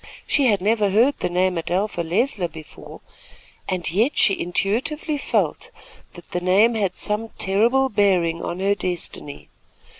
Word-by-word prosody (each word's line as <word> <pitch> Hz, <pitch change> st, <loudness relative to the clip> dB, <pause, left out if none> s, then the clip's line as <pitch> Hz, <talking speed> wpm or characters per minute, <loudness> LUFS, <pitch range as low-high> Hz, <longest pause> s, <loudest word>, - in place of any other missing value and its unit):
She 280 Hz, -3 st, +2 dB
had 205 Hz, -5 st, +2 dB
never 210 Hz, 0 st, +2 dB
heard 235 Hz, +8 st, +3 dB
the -, -, -2 dB
name 180 Hz, 0 st, +1 dB
Adelpha 180 Hz, +3 st, -2 dB
Leisler 185 Hz, +3 st, 0 dB
before, 160 Hz, -2 st, -12 dB, 0.7 s
and 180 Hz, -3 st, -2 dB
yet 225 Hz, -, +1 dB
she 200 Hz, -4 st, +3 dB
intuitively 245 Hz, -, -1 dB
felt -, -, -1 dB, 0.5 s
that 175 Hz, -, -14 dB
the 180 Hz, -, -2 dB
name 195 Hz, +6 st, +4 dB
had 200 Hz, -5 st, -1 dB
some 215 Hz, +2 st, -1 dB
terrible 230 Hz, +8 st, +2 dB
bearing 185 Hz, -7 st, +1 dB
on 175 Hz, -, -4 dB
her 200 Hz, +1 st, +2 dB
destiny. 175 Hz, -6 st, -5 dB
195 Hz, 145 wpm, -22 LUFS, 180-225 Hz, 0.7 s, name